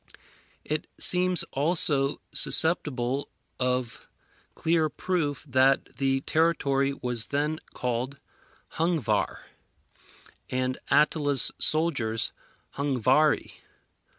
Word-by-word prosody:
It 155 +1 -4
seems 180 -1 +6
also 145 -2 +2
susceptible 140 -5 +2 0.3
of 125 -2 -3 0.5
clear 160 -1 0
proof 155 -6 -3
that 130 +1 +1
the 135 -1 0
territory 140 -4 0
was 125 -4 -2
then 150 +2 -2 0.2
called 125 +3 -4 0.6
Hungvar, 165 - -1 1.1
and 130 0 -3
Attila's 145 -2 +2
soldiers 135 -9 0 0.5
Hungvari. 140 +2 0
140 Hz, 75 wpm, -26 LUFS, 130-155 Hz, 1.1 s, seems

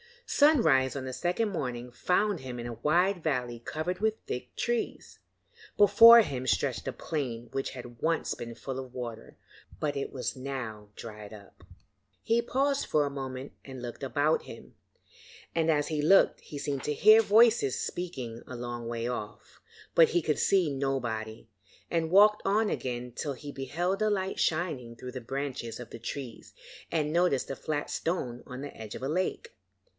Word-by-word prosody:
Sunrise 160 - +4
on 135 - -3
the 130 - -5
second 180 - 0
morning 125 -9 -4
found 180 - +1
him 130 -2 -7
in 120 - -5
a 120 - -4
wide 175 - +2
valley 125 -6 -1
covered 175 +7 -3
with 220 +1 +1
thick 125 0 -6
trees. 240 -1 -3 0.6
Before 230 +3 +9
him 130 - -3
stretched - - 0
a - - -2
plain 120 -7 -4
which 135 - -2
had 120 -2 -10
once 165 +1 0
been 115 -1 -7
full 135 +1 -5
of 130 -1 -8
water, 115 -3 -7 0.4
but 145 -2 -1
it 140 - -3
was 130 - -3
now 125 -6 -5
dried 105 -2 -9
up. 100 -3 -15 0.6
He 230 +1 +2
paused 275 +3 0
for 150 -1 +2
a - - -1
moment 135 -1 -6
and 130 -2 -8
looked 120 +2 -7
about 145 +3 +1
him, - - -11 0.8
and 165 -1 +1
as 145 -2 +2
he 155 -2 -1
looked 190 +6 +5
he 145 - -9
seemed 140 -2 -3
to 150 - 0
hear 215 +8 +7
voices 220 - +4
speaking 130 -10 -5
a 125 - -7
long 120 -1 -5
way 115 0 -3
off. 110 -4 -7 0.3
But 165 - +6
he 175 - +2
could 155 -1 0
see 180 -7 +3
nobody, 120 -5 -3 0.5
and 165 -1 0
walked 210 +3 +6
on 210 +2 +2
again 125 -1 -3
till 140 +4 -3
he 145 +2 -8
beheld 170 +9 -2
a 215 - +3
light 190 -2 -1
shining 155 -8 -1
through 125 +2 -8
the 130 - -6
branches 130 -2 -4
of 125 - -8
the - - -9
trees 120 0 -7 0.4
and 150 -2 0
noticed 170 -7 +2
a - - -3
flat 150 0 -3
stone 125 -8 -2
on 125 0 -7
the 145 - -7
edge 110 -1 -8
of - - -7
a 135 - -1
lake. 185 - -2
140 Hz, 175 wpm, -29 LUFS, 125-175 Hz, 0.8 s, Before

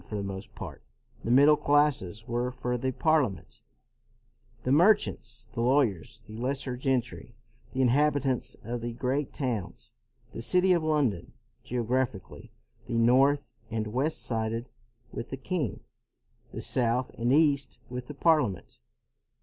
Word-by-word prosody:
For 105 - -7
the 100 - -2
most 95 -1 -7
part, - - -8 0.4
the - - -3
middle 140 +5 +7
classes 140 -9 +1
were 120 +1 -1
for 125 -1 -3
the 130 +2 -1
Parliament, 145 - 0 1.0
the 130 - 0
merchants, 140 - +2
the 115 - -2
lawyers, 120 - +1
the 110 - -10
lesser 130 0 -2
gentry, 125 -3 -2 0.4
the 130 0 +1
inhabitants 140 0 +1
of 120 0 -4
the 120 0 -4
great 130 +4 -1
towns, 120 -9 -4 0.4
the - - -5
city 180 +8 +3
of 170 - +2
London. 140 - 0 0.3
Geographically, 120 -5 -2 0.4
the 115 - -1
north 130 +2 +3 0.2
and 110 -1 -2
west 130 +9 -1
sided 115 +1 -2 0.4
with 115 - -6
the 135 - -5
king; 140 - -3 0.7
the - - -6
south 125 0 0
and 120 +2 -1
east, 145 -1 +3
with 125 0 -6
the 150 - -8
Parliament. 140 - +1
125 Hz, 135 wpm, -28 LUFS, 115-145 Hz, 1.0 s, middle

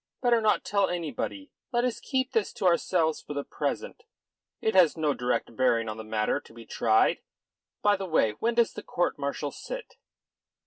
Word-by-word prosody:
Better 240 -2 +4
not 215 -1 +2
tell 200 0 +2
anybody. 180 - -4 0.2
Let 240 -1 +1
us 250 - -1
keep 260 -1 -1
this 225 -5 0
to - - -4
ourselves 170 -2 +2
for 145 - -8
the 145 - -2
present. - - -4 0.6
It 220 - 0
has 175 -4 +5
no 155 -2 +1
direct 125 -2 -2
bearing 115 -3 +2
on 110 0 -4
the 110 - -6
matter 110 0 0
to - - -18
be 115 -1 -11
tried. 110 0 +2 0.6
By 205 -1 +4
the 190 0 -4
way, 155 -10 +3
when 230 - -1
does 235 -1 +3
the - - -6
court - - -1
martial - - -2
sit?" - - -8
180 Hz, 185 wpm, -28 LUFS, -, 0.6 s, has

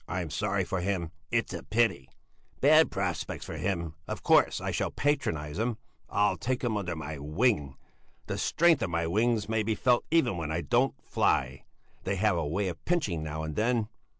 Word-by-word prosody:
I'm 90 -4 -3
sorry 100 +3 0
for 90 0 -2
him! 90 -3 -2 0.2
It's 115 -1 0
a - - -4
pity! 110 - +1 0.5
Bad - - +6
prospects - - -3
for - - -6
him. 85 -4 -2
Of - - -5
course, - - +4
I - - -3
shall - - -1
patronize 85 - -1
him! 115 0 0 0.3
I'll 105 0 +2
take 130 +1 -2
him 120 -3 0
under 90 -4 -2
my 75 -1 -6
wing! 75 - 0 0.5
The - - -4
strength 165 -4 +3
of 110 - 0
my 85 0 0
wings 110 +4 +1
may 110 0 +1
be 110 +1 0
felt 125 +1 +3
even 135 - +2
when 80 -2 -3
I 85 +2 -1
don't 120 +7 +2
fly! - - 0 0.4
They 95 - -1
have 100 0 +2
a 85 -3 -1
way 95 +6 -1
of 85 -2 -6
pinching 145 - 0
now 80 0 -4
and 80 -1 -4
then! 115 -1 +1
100 Hz, 190 wpm, -29 LUFS, 80-115 Hz, 0.5 s, Bad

